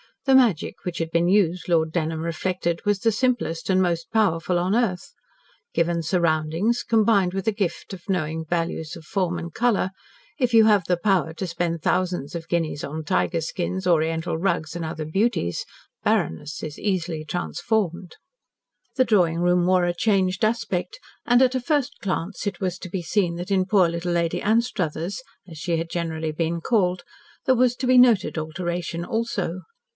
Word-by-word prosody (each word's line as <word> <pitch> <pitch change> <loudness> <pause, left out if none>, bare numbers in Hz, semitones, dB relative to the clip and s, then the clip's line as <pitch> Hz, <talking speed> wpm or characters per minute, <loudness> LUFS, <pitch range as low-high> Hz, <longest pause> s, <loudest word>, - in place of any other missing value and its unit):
The 270 - +4
magic 235 - +2
which 175 -2 -3
had 165 -1 -2
been 170 +1 +2
used, 180 -2 +2
Lord 160 -2 +2
Dunholm 160 -1 -1
reflected, 170 +1 -2
was 205 -1 +2
the 225 +2 +2
simplest 215 -9 -1
and 185 0 +4
most 170 -2 -1
powerful 180 -5 +1
on 180 +4 +1
earth. 230 - -1 0.6
Given 170 0 +1
surroundings, 165 +6 +1
combined 210 -5 +3
with 195 +1 -3
a - - +4
gift 195 -5 -3
for 185 +2 -6
knowing 160 -2 -2
values 165 -1 -2
of - - -11
form 175 0 -1
and 170 -1 -6
colour, 235 -6 +1 0.5
if 250 -3 +1
you 225 -1 +7
have 205 -5 +4
the 180 0 +1
power 180 -4 +1
to 185 +3 -4
spend 170 -1 -2
thousands 180 -5 0
of 165 -1 -6
guineas 165 -4 -1
on 155 +2 -5
tiger 170 -1 0
skins, 185 +3 -3
Oriental 160 -1 +1
rugs, 170 -3 -1
and 170 -1 -3
other 155 -1 -4
beauties, 175 - 0 0.4
barrenness 80 - -1
is 150 -1 -6
easily 175 -6 -1
transformed. 170 - -2 0.8
The 260 -1 +3
drawing 175 -7 +3
room 175 0 +3
wore 180 -1 +3
a 175 - 0
changed 185 0 +1
aspect, 230 - -2 0.3
and 245 +1 +5
at 255 0 +2
a 255 - 0
first 285 0 0
glance 190 +1 -3
it 205 - -3
was 185 -2 -2
to 185 - -8
be 190 0 -3
seen 175 -1 0
that 175 +3 -6
in 190 -1 +3
poor 190 -3 +4
little 170 +1 -3
Lady 170 -1 0
Anstruthers, 200 -4 0 0.3
as 165 -3 -11
she 170 0 -1
had 165 +1 -3
generally 160 -2 -2
been 165 +2 -1
called, 185 -4 +1 0.4
there 260 - +4
was 250 0 +3
to 255 - -2
be 255 0 +5
noted 240 -8 +4
alteration 170 +2 -3
also. 195 -6 -2
175 Hz, 175 wpm, -24 LUFS, 165-205 Hz, 0.8 s, you